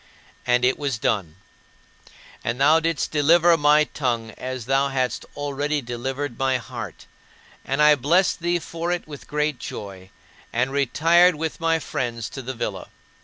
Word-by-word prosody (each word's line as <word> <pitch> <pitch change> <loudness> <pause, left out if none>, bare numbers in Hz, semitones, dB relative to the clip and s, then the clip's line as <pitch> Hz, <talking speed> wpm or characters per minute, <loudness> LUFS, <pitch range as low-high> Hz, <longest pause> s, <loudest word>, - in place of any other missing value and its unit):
And 125 0 +3
it 130 - +1
was 140 -5 -1
done. 95 -8 -1 1.1
And 120 +2 -2
thou 150 +4 +5
didst 165 -2 -1
deliver 165 +3 +5
my 150 -1 +4
tongue 120 -7 -2
as 130 0 -6
thou 135 +2 +2
hadst 130 -2 -2
already 145 +1 -2
delivered 130 +1 -4
my 135 -1 +2
heart; 120 - -8 0.6
and 135 +3 +1
I 150 0 +8
blessed 165 +9 +2
thee 175 0 +1
for 170 +1 -4
it 175 -2 -3
with 145 -3 -10
great 150 -2 -1
joy, 95 -2 -8 0.4
and 125 +3 0
retired 165 +6 +4
with 160 +1 -4
my 165 0 +2
friends 120 -7 -4
to 135 - -7
the 130 +1 -6
villa. - - -4
140 Hz, 155 wpm, -23 LUFS, 125-155 Hz, 1.1 s, I